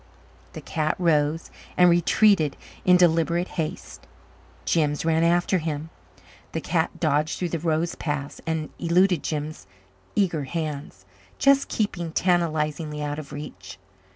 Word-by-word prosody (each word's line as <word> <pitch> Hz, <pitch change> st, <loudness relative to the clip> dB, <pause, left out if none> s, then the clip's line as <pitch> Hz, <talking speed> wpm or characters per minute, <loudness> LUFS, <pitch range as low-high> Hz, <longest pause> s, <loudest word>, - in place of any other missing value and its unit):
The -, -, -7 dB
cat 155 Hz, -1 st, -1 dB
rose 160 Hz, -2 st, +1 dB, 0.3 s
and 180 Hz, -, +7 dB
retreated 175 Hz, -1 st, +3 dB, 0.3 s
in 180 Hz, 0 st, +6 dB
deliberate 170 Hz, 0 st, +2 dB
haste; 165 Hz, +2 st, -5 dB, 0.6 s
Jims 150 Hz, -2 st, +1 dB
ran 165 Hz, 0 st, +2 dB
after 175 Hz, +2 st, +2 dB
him. 155 Hz, 0 st, -4 dB, 0.6 s
The -, -, -1 dB
cat -, -, -1 dB
dodged 150 Hz, +2 st, +1 dB
through 180 Hz, -, -2 dB
the 165 Hz, -, -2 dB
rose 165 Hz, +1 st, 0 dB
paths 145 Hz, -3 st, -4 dB
and 160 Hz, -1 st, -2 dB
eluded 175 Hz, 0 st, +3 dB
Jims' 155 Hz, 0 st, -4 dB, 0.5 s
eager 175 Hz, -8 st, +1 dB
hands, 145 Hz, -, -5 dB, 0.3 s
just 275 Hz, 0 st, +4 dB
keeping 175 Hz, -6 st, -2 dB
tantalizingly 155 Hz, -4 st, 0 dB
out 145 Hz, +1 st, -3 dB
of 140 Hz, -2 st, -9 dB
reach. 95 Hz, -11 st, -8 dB
160 Hz, 125 wpm, -25 LUFS, 150-175 Hz, 0.6 s, and